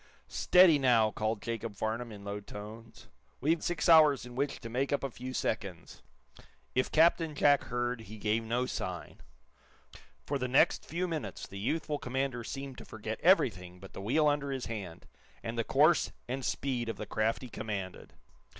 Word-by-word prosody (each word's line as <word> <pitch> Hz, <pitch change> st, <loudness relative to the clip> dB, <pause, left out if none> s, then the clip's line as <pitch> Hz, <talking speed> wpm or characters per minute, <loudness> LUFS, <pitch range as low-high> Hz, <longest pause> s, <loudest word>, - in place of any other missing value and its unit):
"Steady, 180 Hz, -5 st, +5 dB
now!" 115 Hz, -5 st, +4 dB
called 110 Hz, 0 st, -2 dB
Jacob 115 Hz, -2 st, -4 dB
Farnum, 115 Hz, +3 st, -3 dB
in 100 Hz, -1 st, -10 dB
low 100 Hz, 0 st, -4 dB
tones. 110 Hz, +3 st, -10 dB, 0.3 s
"We've 160 Hz, +4 st, +1 dB
six 175 Hz, +1 st, -1 dB
hours 155 Hz, -6 st, +6 dB
in 125 Hz, -, -10 dB
which 140 Hz, +3 st, -2 dB
to 115 Hz, -, -6 dB
make 130 Hz, +4 st, -1 dB
up 145 Hz, -, 0 dB
a 135 Hz, -, -2 dB
few 125 Hz, +2 st, -7 dB
seconds." 100 Hz, -8 st, -4 dB, 0.7 s
If 130 Hz, -, +1 dB
Captain 165 Hz, -1 st, +4 dB
Jack 145 Hz, 0 st, +4 dB
heard, 120 Hz, -1 st, -2 dB
he 110 Hz, 0 st, -10 dB
gave 110 Hz, +2 st, 0 dB
no 120 Hz, +3 st, 0 dB
sign. 90 Hz, -8 st, -5 dB, 1.0 s
For 140 Hz, -1 st, -2 dB
the 125 Hz, -, -1 dB
next 130 Hz, +2 st, +3 dB
few 175 Hz, +3 st, -2 dB
minutes 160 Hz, -3 st, -4 dB
the 100 Hz, -, -9 dB
youthful 150 Hz, +6 st, -1 dB
commander 130 Hz, -1 st, -2 dB
seemed 135 Hz, +2 st, -6 dB
to -, -, -10 dB
forget 110 Hz, 0 st, -6 dB
everything 95 Hz, -, +3 dB
but 95 Hz, +1 st, -12 dB
the -, -, -7 dB
wheel 145 Hz, +9 st, +2 dB
under 145 Hz, -1 st, +1 dB
his 135 Hz, -2 st, -3 dB
hand, 100 Hz, -8 st, -6 dB, 0.4 s
and 115 Hz, -, -4 dB
the 115 Hz, -, 0 dB
course 150 Hz, +8 st, +3 dB, 0.2 s
and 130 Hz, +2 st, -3 dB
speed 125 Hz, -3 st, -2 dB
of -, -, -4 dB
the 105 Hz, -, -5 dB
craft 110 Hz, +4 st, -1 dB
he -, -, -6 dB
commanded. 100 Hz, -4 st, -5 dB
120 Hz, 175 wpm, -31 LUFS, 110-140 Hz, 1.0 s, hours